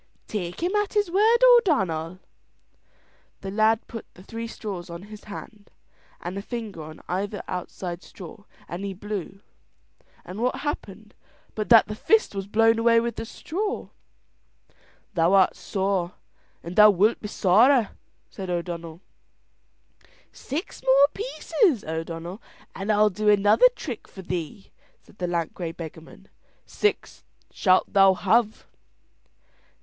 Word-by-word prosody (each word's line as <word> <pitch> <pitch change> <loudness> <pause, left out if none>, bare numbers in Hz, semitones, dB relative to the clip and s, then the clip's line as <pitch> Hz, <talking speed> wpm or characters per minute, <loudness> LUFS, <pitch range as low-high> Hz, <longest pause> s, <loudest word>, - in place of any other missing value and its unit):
"Take 180 -4 -4
him 360 +3 0
at 415 -1 -1
his 410 -4 +1
word, 435 +5 +4
O'Donnell." 195 - +4 1.2
The 195 - -5
lad 220 +2 +2
put 230 - -9
the 185 - -14
three 230 +3 -6
straws 195 -6 -7
on 170 +2 -8
his 210 - -12
hand, 205 0 -10 0.5
and 175 +2 -6
a 200 - -4
finger 215 -6 -6
on 155 0 -10
either 200 +3 -3
outside 180 -1 -5
straw 195 +3 -12 0.2
and 175 +3 -6
he 195 -1 -4
blew; 195 -1 -6 0.8
and 185 +5 -7
what 250 +1 0
happened 215 -8 -5 0.4
but 215 -1 -4
that 230 -2 +7
the 210 - -4
fist 440 - +2
was 195 -1 -4
blown 225 +2 +3
away 230 0 +5
with 235 0 -2
the - - -5
straw. 400 - -4 1.2
"Thou 170 0 +2
art 190 -2 +5
sore, 190 -1 -2 0.5
and 170 +2 -7
thou 210 0 +9
wilt 205 +3 +3
be 210 - -5
sorer," 220 +5 +4 0.4
said 190 -2 -8
O'Donnell. 170 -1 -4 1.3
"Six 310 +9 -6
more 270 +2 +6
pieces, 410 - 0
O'Donnell, 165 +5 -5 0.3
and 195 +3 -2
I'll 210 0 +4
do 210 +3 0
another 205 - +6
trick 250 -8 -7
for 190 - -11
thee," 180 +1 -5 0.3
said - - -22
the 180 - -1
lank 170 -2 -2
grey 170 -3 -5
beggarman. 165 +3 -11 0.4
"Six 420 - -2 0.3
shalt 185 -2 +2
thou 195 -1 +6
have." 215 +4 +1
205 Hz, 135 wpm, -25 LUFS, 180-230 Hz, 1.3 s, thou